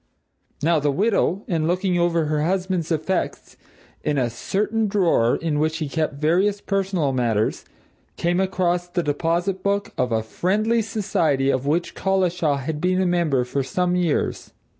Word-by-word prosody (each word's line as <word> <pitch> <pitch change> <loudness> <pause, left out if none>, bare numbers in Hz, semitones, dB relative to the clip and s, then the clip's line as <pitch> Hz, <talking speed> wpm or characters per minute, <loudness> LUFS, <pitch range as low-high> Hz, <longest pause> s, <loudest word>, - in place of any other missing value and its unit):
Now, 165 0 +3
the 145 0 +1
widow, 200 +3 +1
in 160 -3 0
looking 180 0 +1
over 170 -2 +2
her 150 0 0
husband's 180 0 -1
effects, 165 +4 -2 0.5
in 150 - 0
a 125 -3 +1
certain 215 - -1
drawer 175 - +2
in 155 -3 -1
which 155 +1 0
he 155 -3 -3
kept 155 0 -2
various 180 +8 +1
personal 190 -8 -1
matters, 115 -4 0 0.5
came 175 +1 +1
across 180 -2 0
the 175 0 -2
deposit 170 +5 -1
book 200 +1 -1
of 125 -1 +1
a 110 -1 +1
Friendly 215 - 0
Society 165 -11 0
of 130 +1 -1
which 170 +4 0
Collishaw 180 -5 +1
had 150 +3 -4
been 185 +1 +1
a 190 - +2
member 170 -7 +1
for 130 +3 -2
some 180 +6 0
years. 175 -4 -1
170 Hz, 160 wpm, -22 LUFS, 150-190 Hz, 0.5 s, Now